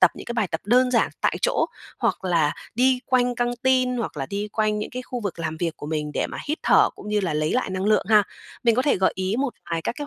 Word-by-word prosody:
tập - - +7
những - - -9
cái 240 - -3
bài 215 -6 0
tập 160 - -3
đơn 250 +4 +4
giản 235 -2 +2
tại - - +1
chỗ, - - +2 0.3
hoặc - - -1
là 165 -5 +2 0.2
đi 255 +1 +3
quanh 250 -1 +2
căn 240 0 0
tin 255 -1 +3
hoặc 230 -9 -3
là 135 - -3
đi 205 +4 -3
quanh 215 -1 +1
những 210 - -4
cái 250 0 -5
khu 250 0 -5
vực 200 -5 -4
làm 160 -1 -3
việc 165 -1 -2
của 145 - -8
mình 150 -1 -3
để - - 0
mà - - -7
hít 305 - -1
thở - - +5
cũng - - -10
như 210 0 +1
là 175 -6 -1
lấy 155 0 0
lại 255 -5 0
năng 185 0 -2
lượng 215 +1 +3
ha. 215 -2 +6 0.4
Mình 230 -2 +4
có 255 - +2
thể 285 - +2
gợi 190 - +2
ý 190 +3 -1
một 275 -3 -1 0.2
vài 165 -1 -1
các - - -2
cái 290 - -4
210 Hz, 285 wpm, -24 LUFS, 175-250 Hz, 0.4 s, tập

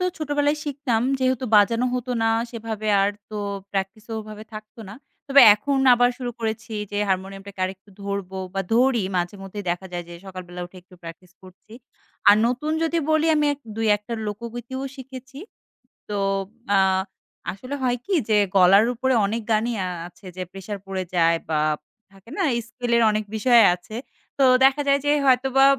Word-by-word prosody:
তো 365 - 0
ছোটবেলায় 290 0 0
শিখতাম। 270 -6 -1 0.2
যেহেতু 260 -1 0
বাজানো 230 +4 +4
হতো 250 0 -3
না 225 - +3 0.2
সেভাবে 220 -2 -5
আর 200 - +2 0.2
তো 215 - -5 0.3
প্র্যাকটিসেও 205 +3 -4
ওভাবে 215 0 -10
থাকত 215 +1 -10
না। 200 - -8 0.3
তবে 280 0 +7
এখন 275 +6 -2 0.2
আবার 245 0 +4
শুরু 245 -1 -3
করেছি 225 0 -4 0.2
যে 205 - -2
হারমোনিয়ামটাকে 195 +1 -4
আরেকটু 190 +2 -7
ধরবো 200 -1 -4 0.2
বা 195 - 0
ধরি। 245 -1 +3
মাঝেমধ্যেই 195 +3 -4
দেখা 175 +2 -3
যায় 175 0 -4
যে 175 - -9
সকালবেলা 180 -1 -8
উঠে 180 - -18
একটু 185 +1 -19
প্র্যাকটিস 170 +2 -11
করছি। 185 +3 -17 0.6
আর 205 - +8
নতুন 255 +6 -1
যদি 330 +1 +1
বলি 315 0 +3
আমি 300 0 +2
এক 285 - -23 0.2
২-১ 210 -2 +2
টা 235 - -2
লোকগীতিও 235 +4 -6
শিখেছি। 265 0 -10 0.7
তো 205 - -2 0.6
আ - - +5 0.7
আসলে 255 +8 -7
হয় 245 -1 +1
কি? 405 - -2 0.2
যে 215 - +4 0.2
গলার 195 +3 +6
উপরে 260 +3 +1
অনেক 225 +3 -2
গানই 225 +2 +1
আ - - -2 0.2
আছে 180 - -19
যে - - -4
প্রেশার 195 +2 -6
পড়ে 190 -1 -3
যায় 165 -1 +4
বা 155 -1 +1 0.5
থাকে 195 +3 -18
না? 390 - +1 0.2
স্কেলের 235 0 0
অনেক 215 0 -1
বিষয় 235 +2 +5
আছে। 180 +5 -12 0.4
তো - - +5 0.2
দেখা 270 +2 +5
যায় 280 0 +4
যে 290 - +3
হয়তোবা 265 +1 +4
220 Hz, 170 wpm, -23 LUFS, 195-255 Hz, 0.7 s, আর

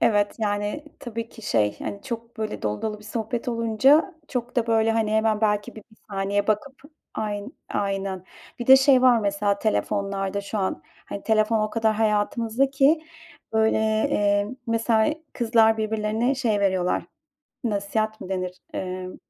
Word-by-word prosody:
Evet, 205 -3 +2
yani 205 +6 -2 0.2
tabii 230 -1 -5
ki 225 - -14
şey, 105 - +1
hani, 200 - -6
çok 235 -2 -6
böyle 215 -1 -4
dolu 105 0 -2
dolu 215 -1 -3
bir 210 - -16
sohbet 230 +2 -3
olunca 245 - +3
çok 245 -1 -4
da 235 -2 +2
böyle 225 -1 +3
hani 220 -1 0
hemen 220 -1 +2
belki 210 -2 0
bir - - -9
1 220 - -21
saniye 200 +1 0
bakıp 215 +6 0 0.4
ayn 210 -1 -4 0.2
aynen. 195 -2 -2 0.3
Bir 240 - -5
de 265 - +10
şey 265 -1 +5
var 250 -2 +6
mesela 200 0 0
telefonlarda 200 -2 -1
şu 200 +2 -4
an. 190 -1 -2 0.2
Hani 200 - -7
telefon 220 0 +2
o 215 0 -1
kadar 225 -1 +1
hayatımızdaki 235 +7 +2 0.5
böyle, 220 0 +3
eee, 205 -2 +1 0.2
mesela 230 +3 +2 0.2
kızlar 225 -2 +3
birbirlerine 220 +3 0
şey 230 -6 0
veriyorlar, 185 -2 +1 0.6
nasihat 215 0 -1
mı - - -7
denir, 185 -1 -3 0.2
emm, 185 0 -5
220 Hz, 150 wpm, -24 LUFS, 205-230 Hz, 0.6 s, de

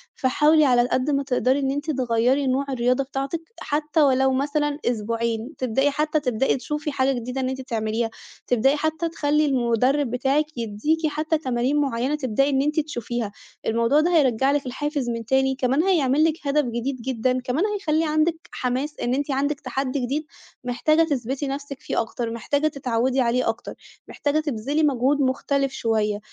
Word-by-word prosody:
فحاولي 300 +4 +4
على 245 -3 +4
القد 255 +3 0
ما 275 0 +1
تقدَري 260 0 +1
إن 270 -1 0
أنتِ 290 +3 -2
تغيّري 255 +1 +1
نوع 265 +2 +1
الرياضة 255 +1 +1
بتاعتِك 275 +4 -4 0.2
حتى 300 +1 0
ولو 265 -2 +4
مثلًا 290 +2 0
أسبوعين، 230 +1 -1
تبدئي 265 +3 +1
حتى 305 +2 0
تبدئي 255 -2 +1
تشوفي 300 +3 -3
حاجة 270 -1 +1
جديدة 250 +3 -4
إن 255 - -1
أنتِ 265 0 -4
تعمليها، 225 -1 -2 0.4
تبدئي 250 +4 +3
حتى 315 +2 -1
تخلّي 300 -1 +1
المُدرِّب 255 0 +1
بتاعِك 270 +4 +1
يدّيكِ 240 +9 0
حتى 310 +1 0
تمارين 255 0 0
معيّنة 265 +1 0
تبدئي 275 -1 +1
إن 270 -1 +2
أنتِ 300 +2 +1
تشوفيها، 240 -7 -3 0.3
الموضوع 230 +6 +2
ده 345 +2 +2
هيرجّع 265 -3 +3
لِك 285 -1 0
الحافِز 285 0 -2
من 230 -1 -3
تاني، 265 +2 +2
كمان 270 +3 +1
هيعمل 310 -6 +3
لِك 315 -2 0
هدف 290 +1 +2
جديد 240 +2 -3
جدًا، 255 0 0
كمان 255 +7 -1
هيخلّي 330 -7 0
عندِك 320 +2 0
حماس 260 +4 -3
إن 240 - 0
أنتِ 285 +2 -1
عندِك 285 +2 0
تحدّي 265 +1 -2
جديد 275 +5 -2 0.4
محتاجة 310 +6 +2
تثبِتي 275 -2 -2
نفسِك 275 0 -5
فيه - - -1
أكتر، 230 0 -4
محتاجة 285 +6 0
تتعوّدي 260 -2 0
عليه 245 0 +1
أكتر، 225 - -4 0.3
محتاجة 290 +1 -1
تبذلي 290 +1 -1
مجهود 280 0 +2
مختلِف 275 +1 0
شوية، 215 -4 0
270 Hz, 165 wpm, -23 LUFS, 245-295 Hz, 0.4 s, فحاولي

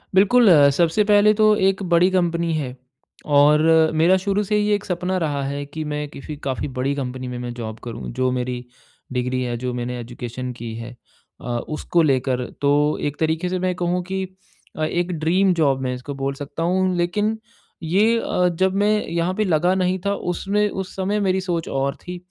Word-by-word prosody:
बिल्कुल, 210 +3 +5 0.2
सबसे 170 +7 +2
पहले 210 0 +5
तो 215 0 +4
एक 195 +1 0
बड़ी 175 +1 +3
कंपनी 170 -2 +1
है, 130 -5 -3 0.5
और 150 +1 +5 0.3
मेरा 170 +4 +4
शुरू 200 +2 0
से 210 +2 -1
ही 210 0 +2
ये 210 - +3
एक 205 - -5
सपना 180 +1 -2
रहा 145 -5 -1
है 140 +1 -3
कि 155 +2 -6
मैं 150 0 -3
किसी 150 +2 -8
काफ़ी 135 +1 -2
बड़ी 135 +2 0
कंपनी 130 -2 -4
में 125 0 -5
मैं 120 -1 -5
जॉब 110 -2 -6
करूँ 120 -2 -6
जो 130 0 +2
मेरी 125 -1 -3 0.5
डिग्री 125 +1 -1
है, 120 -1 -2
जो 125 0 -3
मैंने 125 0 -4
एजुकेशन 120 +1 -6
की 120 -2 -7
है 115 +2 -8 0.5
अ, - - -8 0.2
उसको 165 +2 0
लेकर। 130 -3 +1 0.2
तो 145 +1 +2
एक 145 - -5
तरीके 160 +3 0
से 185 0 -1
मैं 185 0 0
कहूँ 180 0 -1
कि 190 +1 -3 0.5
अ, 155 - -1
एक 175 +3 -1
ड्रीम 185 +4 +3
जॉब 140 -6 +1
मैं 125 -1 -1
इसको 130 +3 -7
बोल 135 0 -2
सकता 145 +3 -6
हूँ 185 +1 +1
लेकिन 210 +6 0 0.5
ये 210 +8 +3
अ, 180 -4 +1
जब 185 +3 0
मैं 210 +1 +2
यहाँ 170 +2 -1
पे 215 - 0
लगा 175 +1 +2
नहीं 185 0 0
था 200 - +1
उसमें 200 +4 -1
उस 190 -1 -6
समय 195 +2 -1
मेरी 190 -1 +1
सोच 175 -3 -2
और 135 0 -1
थी 180 0 -5
165 Hz, 195 wpm, -22 LUFS, 135-190 Hz, 0.5 s, बिल्कुल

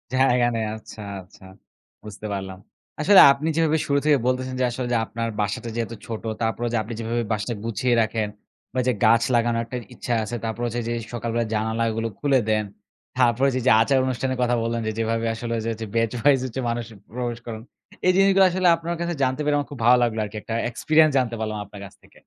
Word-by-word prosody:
জায়গা 125 -2 +3
নেই 110 -1 -1
আচ্ছা, 110 0 -11 0.2
আচ্ছা, 90 +2 -19 0.6
বুঝতে 105 0 -9
পারলাম। 95 -1 -5 0.4
আসলে 195 +5 +8
আপনি 140 +3 -2
যেভাবে 160 -1 +3
শুরু 140 0 +2
থেকে 150 -2 +5
বলতেছেন 130 0 -1
যে 130 - +3
আসলে 125 +1 -4
যে - - +3
আপনার 115 +1 -4
বাসাটা 105 +3 -3
যেহেতু 115 0 -3
ছোট 115 -2 -5 0.2
তারপরে 115 +1 -1
যে - - +2
আপনি 115 +3 -7
যেভাবে 115 +1 -1
বাসাটা 110 +2 -2
গুছিয়ে 115 +2 0
রাখেন 110 -1 -1 0.5
বা 130 - -1
যে 125 - +3
গাছ 115 +1 +5
লাগানোর 115 0 +2
একটা 125 +2 -5 0.2
ইচ্ছা 120 - -3
আছে, 110 +3 -5
তারপর 110 +1 -4
হচ্ছে 120 +1 -3
যে - - -2 0.2
সকাল 120 0 -3
বেলায় 115 -2 -1
জানালাগুলো 110 +1 -1
খুলে 140 -2 +3
দেন। 110 -1 +1 0.5
তারপরে 125 +1 +3
হচ্ছে 130 -1 0
যে - - -7
ওই - - -8
যে - - +7
আচার 135 +4 +3
অনুষ্ঠানের 130 0 -2
কথা 125 0 +2
বললেন, 115 0 -1
যে - - 0
যেভাবে 115 0 0
আসলে 115 0 -4 0.2
হচ্ছে 110 0 -5
বেচ 115 -1 +2
ওয়াইজ 140 +2 +4
হচ্ছে 130 +1 -4
মানুষ 115 0 -2 0.3
প্রবেশ 120 -1 -3
করান। 110 -2 -6 0.5
এই - - +7
জিনিসগুলো 195 0 +5
আসলে 185 0 +1
আপনার 165 +1 -4
কাছে 170 0 -1
জানতে 130 +2 0
পেরে 150 0 +2
আমার 145 - -2
খুব 140 - -8
ভালো 125 +1 +7
লাগলো 115 -2 0
আরকি, 105 +1 -7
একটা 110 - -6 0.2
এক্সপেরিয়েন্স 155 +5 +3
জানতে 120 -3 0
পারলাম 110 -1 -3
আপনার 100 0 -12
কাছ 95 - -13
থেকে। - - -21
120 Hz, 215 wpm, -23 LUFS, 110-130 Hz, 0.6 s, আসলে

